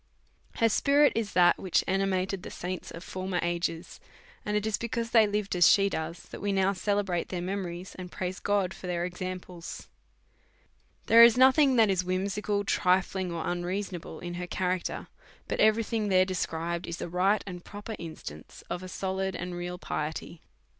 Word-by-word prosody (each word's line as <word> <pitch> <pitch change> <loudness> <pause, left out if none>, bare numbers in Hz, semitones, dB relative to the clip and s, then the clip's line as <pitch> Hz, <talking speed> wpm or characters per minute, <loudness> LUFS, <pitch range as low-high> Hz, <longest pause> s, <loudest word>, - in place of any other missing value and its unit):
Her 230 - +3
spirit 285 +6 +4
is 220 -3 -2
that 175 -1 +5
which 185 - +1
animated 190 0 0
the - - -8
saints 180 0 -5
of 165 - -9
for 185 0 -5
mer 185 -2 -1
ages; 170 -1 -2 0.4
and 210 0 0
it 210 - -1
is 220 -1 +1
because 235 0 -3
they 225 -3 +6
lived 205 -2 -1
as 175 -1 +6
she 200 0 +5
does 165 0 -4
that - - -8
we 205 - 0
now 195 0 +2
celebrate 195 -2 -1
their 180 - -3
memories, 180 -1 -4
and 180 -1 -8
praise 185 0 -4
God 200 -2 0
for 185 - -9
their 175 -1 -1
examples. 180 -1 -7 1.2
There 230 +1 +8
is 235 0 +7
nothing 265 +1 +6
that 220 -4 +5
is 185 -1 +1
whimsical, 200 +3 -1
trifling, 185 -1 +1
or 170 -1 -3
un 175 0 -1
reasonable 180 -3 -4
in 175 0 -6
her 180 - -4
character, 180 0 -2 0.4
but - - -3
every 220 +1 +4
thing 220 -1 -1
there 185 -2 +4
is - - -4
described 170 -1 -2
in 170 - -3
a - - -4
right 185 +4 +2
and 180 -3 -7
proper 205 +2 -7
instance 120 - -9
of 175 - -2
a 185 - -7
solid 190 0 -2
and 180 0 -5
real 175 0 -4
piety. 160 0 -4
185 Hz, 185 wpm, -28 LUFS, 175-205 Hz, 1.2 s, There